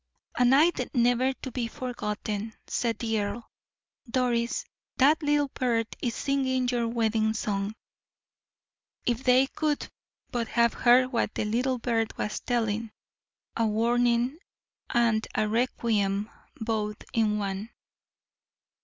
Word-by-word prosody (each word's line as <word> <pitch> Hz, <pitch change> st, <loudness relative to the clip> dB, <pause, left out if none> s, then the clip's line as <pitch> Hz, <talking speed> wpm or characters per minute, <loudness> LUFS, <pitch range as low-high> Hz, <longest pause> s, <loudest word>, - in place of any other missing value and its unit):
"A 250 Hz, -, +3 dB
night 290 Hz, +8 st, +5 dB
never 245 Hz, +2 st, +3 dB
to 260 Hz, 0 st, -8 dB
be 240 Hz, -1 st, -2 dB
forgotten," 215 Hz, -3 st, -4 dB
said 230 Hz, -3 st, -1 dB
the 225 Hz, -1 st, -1 dB
earl. 205 Hz, +3 st, -4 dB, 0.6 s
"Doris, 240 Hz, -1 st, 0 dB, 0.3 s
that 290 Hz, +5 st, +5 dB
little 290 Hz, -1 st, +2 dB
bird 235 Hz, -3 st, 0 dB, 0.2 s
is 240 Hz, -1 st, -1 dB
singing 260 Hz, -2 st, 0 dB
your 240 Hz, -2 st, 0 dB
wedding 220 Hz, -1 st, +1 dB
song." 205 Hz, 0 st, -2 dB, 1.3 s
If 240 Hz, +1 st, 0 dB
they 255 Hz, +1 st, +5 dB
could 295 Hz, +1 st, -2 dB, 0.4 s
but 235 Hz, -3 st, -1 dB
have 235 Hz, 0 st, +2 dB
heard 255 Hz, +1 st, +4 dB
what 235 Hz, -, 0 dB
the -, -, -1 dB
little 250 Hz, +4 st, 0 dB
bird 230 Hz, -2 st, -1 dB
was 210 Hz, -, -2 dB
telling 225 Hz, -2 st, -1 dB, 0.7 s
a 230 Hz, -1 st, +2 dB
warning 240 Hz, +5 st, +2 dB, 0.5 s
and 230 Hz, -3 st, +2 dB
a 215 Hz, -, +2 dB
requiem 215 Hz, -3 st, 0 dB, 0.3 s
both 215 Hz, -2 st, -2 dB
in 215 Hz, -2 st, +2 dB
one. 200 Hz, +1 st, -3 dB
235 Hz, 120 wpm, -27 LUFS, 220-255 Hz, 1.3 s, night